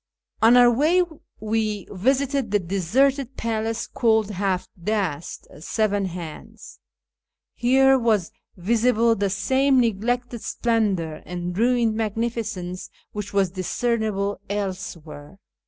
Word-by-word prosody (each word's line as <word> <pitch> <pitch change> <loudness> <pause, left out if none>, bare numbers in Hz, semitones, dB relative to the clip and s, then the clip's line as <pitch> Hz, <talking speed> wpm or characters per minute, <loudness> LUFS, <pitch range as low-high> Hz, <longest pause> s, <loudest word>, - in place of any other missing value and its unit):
On 230 +3 +7
our 245 -1 +7
way 315 +9 +3 0.4
we 215 -2 -2
visited 265 +5 0
the 205 - +3
deserted 245 - 0
palace 225 0 -2
called 220 -3 +1
Haft 190 -1 -2
dast 185 -7 -2
(" - - -13
Seven 205 +3 0
Hands 180 +5 -9 0.4
"). - - -66 0.3
Here 265 +2 +4
was 215 -7 +1 0.3
visible 230 +4 +2
the 200 -2 0
same 265 +7 +2
neglected 240 +1 -1
splendour 200 -9 -1
and 175 0 -4
ruined 235 +1 +2
magnificence 215 -4 -3 0.2
which 210 -1 -6
was 195 -3 +1
discernible 205 +1 -1
elsewhere. 180 -7 -5
220 Hz, 110 wpm, -23 LUFS, 190-240 Hz, 0.4 s, On